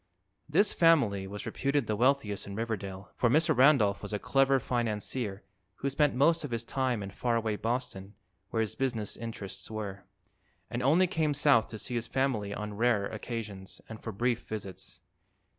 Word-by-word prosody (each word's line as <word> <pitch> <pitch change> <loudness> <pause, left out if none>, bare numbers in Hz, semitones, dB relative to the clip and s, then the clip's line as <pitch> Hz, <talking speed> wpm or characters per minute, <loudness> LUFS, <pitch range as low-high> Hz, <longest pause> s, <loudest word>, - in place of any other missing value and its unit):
This 195 +7 +3
family 120 - +4
was 105 +1 -7
reputed 140 -1 0
the 110 - -1
wealthiest 120 -4 +1
in 100 - -6
Riverdale, 100 -4 -4
for 120 - +2
Mr. 155 +6 +4
Randolph 125 -7 +5
was - - -5
a - - +1
clever 135 +4 +3
financier 115 -3 -2 0.3
who 140 - -2
spent 145 0 +2
most 160 +6 +3
of 145 - -4
his 115 -1 -2
time 125 -4 -1
in 100 - -6
far 120 +4 0
away 110 -2 0
Boston, 110 -4 -3 0.3
where 115 - 0
his 110 - -1
business 120 -6 -2
interests 100 -5 -6
were, 105 -3 -5 0.7
and 120 - -2
only 155 +9 +5
came 160 -4 0
South 140 -6 +4
to 110 - -7
see 125 - -5
his 120 -1 -2
family 125 -7 0
on 105 0 -4
rare 110 -1 +2
occasions 105 -3 -6
and 110 -1 -9
for 110 - -5
brief 120 +3 0
visits. 95 -3 -7
115 Hz, 175 wpm, -30 LUFS, 105-135 Hz, 0.7 s, Randolph